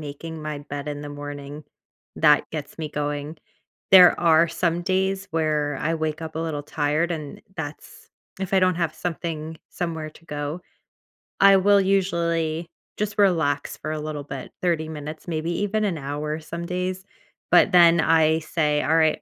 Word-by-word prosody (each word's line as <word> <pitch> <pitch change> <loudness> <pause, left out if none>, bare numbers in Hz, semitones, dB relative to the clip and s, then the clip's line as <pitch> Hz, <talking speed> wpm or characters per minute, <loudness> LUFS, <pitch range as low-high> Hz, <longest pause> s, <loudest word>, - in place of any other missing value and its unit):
making 155 +2 -7
my 150 -1 -4
bed 145 0 -7
in 145 -1 -4
the 145 - -7
morning, 145 0 -8 0.5
that 150 -2 +5
gets 150 -3 -6
me 155 -2 -5
going. 145 +1 -3 0.5
There 180 -2 +8
are 165 0 +5
some 170 0 -1
days 190 +1 0
where 150 -3 0
I 165 - 0
wake 155 -1 -2
up 160 -1 -7
a - - -2
little 160 -3 -3
tired, 150 +4 0
and 160 +5 -5 0.2
that's 150 -1 -8 0.3
if 190 0 -4
I 190 - +4
don't 185 -1 +3
have 170 -3 -1
something 160 -2 -4
somewhere 160 -3 -4
to 165 - -19
go. 145 +3 -4 0.8
I 195 0 +7
will 200 +1 +5
usually 170 -4 0 0.3
just 210 0 -3
relax 160 -8 +2
for 155 - -5
a 155 - -3
little 150 -1 -5
bit, 135 -2 -8
30 160 -3 0
minutes, 155 +1 -7
maybe 165 0 -2
even 210 +1 0
an 190 -6 0
hour 150 +2 -3
some 170 +2 -6
days. 185 +2 -3 0.5
But - - +6
then 170 -1 +6
I 160 0 +4
say, 150 -2 0
"Alright, 160 0 +2
160 Hz, 165 wpm, -24 LUFS, 150-175 Hz, 0.8 s, There